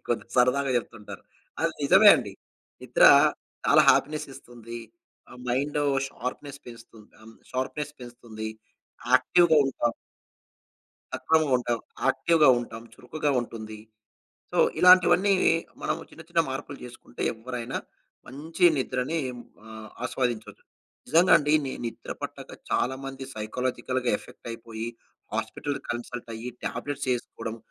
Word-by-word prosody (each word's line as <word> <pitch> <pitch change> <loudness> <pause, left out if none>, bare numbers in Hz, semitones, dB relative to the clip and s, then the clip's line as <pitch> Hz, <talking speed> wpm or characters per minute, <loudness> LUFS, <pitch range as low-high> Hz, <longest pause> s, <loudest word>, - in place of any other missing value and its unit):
కొందరు 115 -2 -2
సరదాగా 130 +2 +3
చెప్తుంటారు. 115 -3 -6 0.4
అది - - +1
నిజమే - - +7
అండి. - - -5 0.5
నిద్ర - - 0 0.6
చాలా - - +6
హ్యాపీనెస్ 150 +2 +1
ఇస్తుంది. 120 -1 -10 0.5
ఆ - - -11
మైండ్ 140 +4 0 0.3
షార్ప్‌నెస్ 140 +2 -6
పెంచుతుంది. 115 -2 -14
అన్ 110 0 -14 0.2
షార్ప్‌నెస్ 145 +3 -3
పెంచుతుంది. 120 -3 -8 0.6
యాక్టివ్‌గా 170 -3 +5
ఉంటాం. 120 -3 -1 1.2
సక్రమంగా 160 -3 +1
ఉంటాం. 120 -1 -1 0.3
యాక్టివ్‌గా 155 +2 +4
ఉంటాం. 115 -1 -7
చురుకుగా 150 +3 -3
ఉంటుంది. 110 -2 -8 0.7
సో, - - -3 0.2
ఇలాంటివన్నీ 185 +2 +6 0.5
మనము - - -2
చిన్న, 165 - -13
చిన్న 170 -1 +3
మార్పులు 135 +1 -6
చేసుకుంటే 120 0 -11
ఎవ్వరైనా 120 +2 -5 0.5
మంచి 160 +6 -1
నిద్రని 130 +4 -1 0.5
ఆహ్, 110 -1 -10
ఆస్వాదించొచ్చు. 120 -4 -3 0.4
నిజంగా 170 +3 +5
అండి. 150 0 0
ని 130 - -3
నిద్ర 115 - -6
పట్టక - - -7 0.2
చాలామంది 135 +1 -2
సైకలాజికల్‌గా 125 +3 -2
ఎఫెక్ట్ - - -12
అయిపోయి 115 0 -6 0.5
హాస్పిటల్‌కి 145 -1 -4
కన్సల్ట్ 120 0 -6
అయ్యి 120 +3 -6 0.2
టాబ్లెట్స్ 145 -1 -4
ఏసుకోవడం 115 -1 -7
125 Hz, 110 wpm, -26 LUFS, 115-145 Hz, 1.2 s, నిజమే